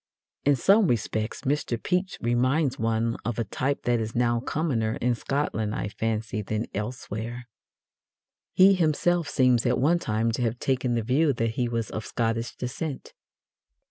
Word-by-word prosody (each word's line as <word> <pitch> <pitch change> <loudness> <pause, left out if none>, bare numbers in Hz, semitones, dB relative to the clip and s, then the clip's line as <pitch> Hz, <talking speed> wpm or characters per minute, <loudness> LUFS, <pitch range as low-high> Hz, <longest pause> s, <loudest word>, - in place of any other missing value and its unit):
In 145 0 +5
some 195 - +4
respects 110 -2 -1
Mr. 135 -3 -1
Pepys 180 - -1
reminds 130 +4 +1
one 115 0 0
of 120 -1 -3
a 115 - +1
type 130 +6 -2
that 120 -1 +2
is 110 0 -4
now 120 -1 +2
commoner 120 -5 -1
in 125 +1 +2
Scotland, 115 -4 -2
I 105 - -3
fancy, 110 0 -2
than 110 +2 -2
elsewhere. 115 +2 -5 1.1
He 190 +1 +7
himself 175 -1 +1
seems 125 -4 +3
at 125 0 +2
one 155 +7 +3
time 110 -3 0
to 120 - -3
have 120 0 0
taken 125 -2 0
the 115 - 0
view 140 +6 +2
that 115 -1 -1
he 120 +1 -1
was 115 -1 -2
of 110 - -4
Scottish 115 +1 -1
descent. 135 +3 -5
120 Hz, 160 wpm, -26 LUFS, 115-140 Hz, 1.1 s, He